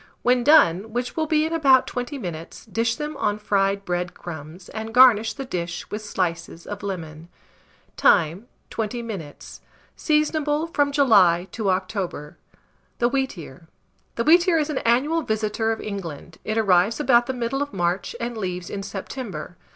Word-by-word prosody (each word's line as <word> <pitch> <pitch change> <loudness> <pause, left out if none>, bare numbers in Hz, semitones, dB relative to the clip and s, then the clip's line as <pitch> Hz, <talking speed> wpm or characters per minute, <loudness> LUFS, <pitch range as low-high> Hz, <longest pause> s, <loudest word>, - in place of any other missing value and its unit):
When 245 0 +3
done, 220 - +4
which 245 +1 -3
will 315 -1 -1
be 310 0 +2
in 320 - -3
about 270 -5 +5
20 250 +4 -4
minutes, 170 -8 -7
dish 230 0 -1
them 300 0 -5
on 210 -4 0
fried 200 -1 0
bread 175 0 -2
crumbs, 165 +2 -9
and 220 +1 -6
garnish 235 -4 +6
the 275 - -6
dish 175 -6 -4
with 210 - -4
slices 170 -4 -3
of 205 0 -6
lemon. 165 -4 -6 0.7
Time. 180 +5 +3 0.2
20 230 +2 -3
minutes. 190 -11 -8 0.3
Seasonable 305 0 +1
from 285 -1 +2
July 195 - +4
to 215 -4 -2
October. 185 -5 -3 0.6
THE 240 - +2
WHEATEAR. 180 - -4 0.5
The 230 - 0
wheatear 340 +3 +5
is 305 0 -1
an 275 - -1
annual 280 +8 +2
visitor 220 -2 -1
of 225 - -3
England: 170 -6 -7
it 215 +1 -2
arrives 200 +1 +3
about 240 -5 +4
the 260 - -2
middle 250 +2 -2
of 285 0 -3
March 175 +1 -1
and 235 0 -4
leaves 180 -4 -4
in 200 - -4
September. 200 0 -6
215 Hz, 160 wpm, -23 LUFS, 180-260 Hz, 0.7 s, garnish